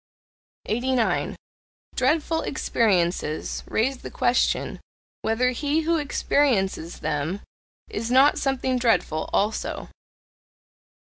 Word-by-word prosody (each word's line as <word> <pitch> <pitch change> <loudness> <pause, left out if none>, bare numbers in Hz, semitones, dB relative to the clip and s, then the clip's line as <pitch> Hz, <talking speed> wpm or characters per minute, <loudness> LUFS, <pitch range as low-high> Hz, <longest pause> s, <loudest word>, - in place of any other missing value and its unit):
89. 245 +1 0 0.6
Dreadful 315 +4 +1
experiences 180 - 0
raise 255 +4 0
the - - -8
question 245 +1 +1 0.4
whether 250 +3 +1
he 290 +5 0
who 330 +1 +1
experiences 245 - 0
them 155 +7 -2 0.5
is 225 +2 -4
not 265 +3 +5
something 260 -2 0
dreadful 225 -10 +1
also. 210 +2 -1
250 Hz, 85 wpm, -24 LUFS, 205-275 Hz, 0.6 s, not